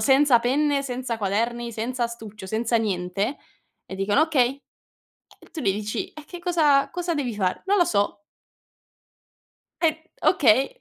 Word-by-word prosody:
senza 265 +1 +5
penne, 280 +3 +1
senza 250 -3 -3
quaderni, 235 +4 -1
senza 240 +3 -2
astuccio, 220 -4 -7
senza 230 +3 0
niente 200 +3 -1 0.5
e 190 - -7
dicono: 205 +9 +2
"Okay." 275 -4 +1 0.8
E - - -17
tu 320 - -5
gli 195 -7 +2
dici: 210 +1 -3
"E 305 -1 -11
che 355 - -8
cosa 300 -6 +3
cosa 350 +2 -2
devi 255 -7 -2
fare?" 185 -3 -1
"Non 405 +1 +3
lo 350 - +5
so." 205 -3 0 1.6
E 315 -2 +3 0.3
okay. 270 - +4
245 Hz, 145 wpm, -24 LUFS, 215-290 Hz, 1.6 s, senza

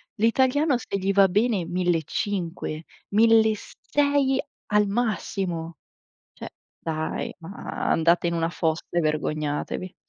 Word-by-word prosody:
l'italiano 260 +5 +3
se 210 - -5
gli 195 +1 0
va 195 0 +6
bene 205 -1 +1
1.500-1.600 210 - 0 0.3
al 210 -1 +4
massimo. 190 -7 -2 0.6
Cioè, - - -8 0.3
dai, 160 -1 -3
ma 170 +4 -5
andate 170 +2 +3
in 170 - -1
una 165 0 0
fossa 160 -2 -1
e 175 - +1
vergognatevi. 155 +3 -2
190 Hz, 100 wpm, -25 LUFS, 165-225 Hz, 0.6 s, va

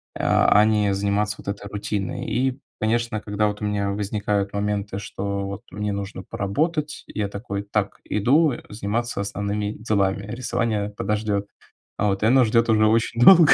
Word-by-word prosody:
э, - - -4
а 105 - +5
не 105 -2 +2
заниматься 100 +2 0
вот - - -13
этой 100 0 -5
рутиной. 100 -1 -3
И, 125 +4 0 0.2
конечно, 115 0 0
когда 105 0 0
вот 105 0 -4
у - - -1
меня 100 -1 0
возникают 100 0 -1
моменты, 100 -1 -2
что 100 0 -3
вот 100 +1 -5
мне 105 0 -2
нужно 100 -1 -5
поработать, 150 - -2
я 105 -1 -2
такой: 100 0 -5
"Так, 100 0 -2
иду, 140 +9 +3
э, - - -7
заниматься 110 +2 -2
основными 100 +1 -2
делами. 100 -3 0
Рисование 115 -4 -1
подождёт". 105 -1 -1 0.5
Вот 100 -1 +1
и - - +4
оно 130 +3 +6
ждёт 115 +1 +3
уже 110 -1 +4
очень 115 +2 +1
долго. 170 +1 +9
105 Hz, 165 wpm, -23 LUFS, 100-110 Hz, 0.5 s, долго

